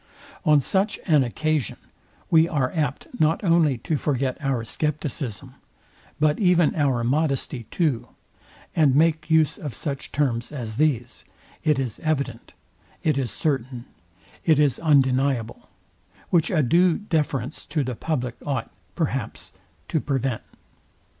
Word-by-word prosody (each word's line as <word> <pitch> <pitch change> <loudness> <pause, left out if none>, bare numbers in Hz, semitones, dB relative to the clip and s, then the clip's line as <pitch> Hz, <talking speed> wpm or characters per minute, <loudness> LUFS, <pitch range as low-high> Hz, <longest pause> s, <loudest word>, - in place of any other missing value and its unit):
On 150 -1 +6
such 195 - 0
an 150 -6 +4
occasion 150 0 -1 0.5
we 160 0 +5
are 135 -5 0
apt 150 -6 -1
not 160 +4 +2
only 165 -7 +3
to 150 +6 -2
forget 135 -3 -1
our 135 -4 0
scepticism, 140 - -3 0.7
but 150 0 +2
even 180 -5 +4
our 135 -6 +1
modesty 135 -3 -1
too; 150 -9 0 0.7
and 145 -5 +4
make 160 +1 +2
use 160 -1 +3
of 145 -7 -6
such 140 -3 -5
terms 125 -5 0
as 115 -7 -5
these, 130 -6 0 0.4
it 155 -3 +3
is 130 -5 -3
evident, 140 -7 -3 0.5
it 155 -3 +2
is 130 -3 -1
certain, 130 - -2 0.6
it 160 -3 +4
is 145 -4 +2
undeniable; 135 -5 +1 0.6
which 170 -3 +3
a 160 -5 +2
due 170 +6 +4
deference 150 - -2
to 150 -3 0
the 130 -1 -3
public 125 -2 -2
ought, 135 -5 -3 0.2
perhaps, - - -3 0.4
to 160 - 0
prevent. 135 -4 -1
145 Hz, 130 wpm, -24 LUFS, 130-155 Hz, 0.7 s, On